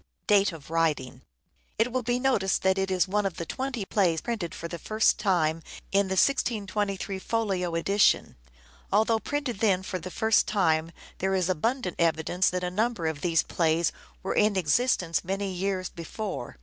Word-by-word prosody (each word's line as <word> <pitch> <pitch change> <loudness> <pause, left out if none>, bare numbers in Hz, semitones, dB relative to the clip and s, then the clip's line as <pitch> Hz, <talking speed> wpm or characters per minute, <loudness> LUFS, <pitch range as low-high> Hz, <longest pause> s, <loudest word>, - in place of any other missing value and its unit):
Date 200 -1 +4
of 160 -2 -11 1.1
It 230 +3 +1
will 255 +1 0
be 245 +1 0
noticed 250 -7 +1
that 190 0 +3
it 190 0 0
is 185 -2 +2
one 210 +2 0
of 190 - -7
the 170 - -4
twenty 260 +2 -3
plays 180 -6 +1
printed 215 -7 -4
for 170 - -5
the 170 0 -7
first 215 +5 +2
time 165 -6 +2 0.3
in 200 0 +3
the 190 - -2
1623 200 -4 0
folio 190 -6 -1
edition. 200 +4 +2 0.6
Although 220 +2 +3
printed 275 -2 -3
then 190 -4 +2
for 185 -1 -4
the 185 - -7
first 220 +3 +2
time 165 -5 +1 0.3
there 190 +1 0
is 185 -1 0
abundant 185 - -1
evidence 165 +2 +2
that 180 0 -3
a 180 - -2
number 215 -2 -1
of 160 -2 -2
these 170 -2 +2
plays 165 0 +1 0.3
were 190 - -1
in 210 -1 +3
existence 180 - +1
many 195 +1 -2
years 185 0 -2
before. 170 - -6
190 Hz, 170 wpm, -27 LUFS, 175-215 Hz, 1.1 s, Date